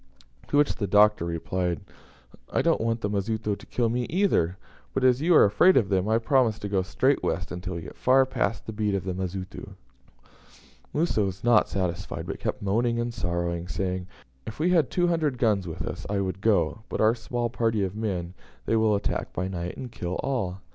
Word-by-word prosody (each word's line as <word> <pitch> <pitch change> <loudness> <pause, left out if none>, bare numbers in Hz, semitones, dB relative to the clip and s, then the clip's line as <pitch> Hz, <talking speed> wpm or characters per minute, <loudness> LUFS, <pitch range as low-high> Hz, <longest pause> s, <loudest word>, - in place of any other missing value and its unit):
To 145 - +1
which 145 0 +3
the 100 - -2
Doctor 105 -2 +4
replied, 85 0 -2 0.7
"I - - +1
don't - - +2
want 115 0 0
the - - 0
Mazitu 105 +1 -1
to - - -14
kill 120 -2 0
me 120 +1 -1
either; 155 - +1 0.4
but, 135 - 0
as 130 +1 +4
you 170 +2 +4
are - - +8
afraid 180 - +5
of 105 - +2
them, 95 +1 +1
I 110 - +4
promise 115 -2 +2
to 105 - -5
go 100 -2 +1
straight 130 +9 +1
west 90 -4 -2
until 90 +1 -5
we 85 - -4
get - - -10
far 130 +1 +4
past 130 -4 -2
the 110 - -6
beat 105 -1 0
of 95 - -2
the 95 -1 -3
Mazitu." 95 +1 -6 1.2
Musa 155 -7 +1
was 95 -1 -3
not 120 -2 +4
satisfied, 90 -3 -3
but - - -5
kept - - -3
moaning 115 +4 +1
and 120 0 -2
sorrowing, 85 -2 -2
saying, 90 +2 -3 0.4
"If 110 - -6
we 170 +4 +1
had 165 -6 +3
two 175 - +1
hundred 160 -6 +1
guns 105 -7 +1
with 80 - -5
us - - -6
I 100 -1 0
would 95 0 -3
go; 100 -4 +2
but - - -3
our 110 +1 +5
small 120 0 -3
party 115 -4 0
of 95 +1 -3
men 95 -6 -3 0.3
they 115 - +1
will 110 -1 +3
attack 100 - -2
by 95 +2 -2
night, 90 -2 -5
and 125 -2 -7
kill 90 -3 -4
all." 95 -9 -2
105 Hz, 210 wpm, -26 LUFS, 95-120 Hz, 1.2 s, are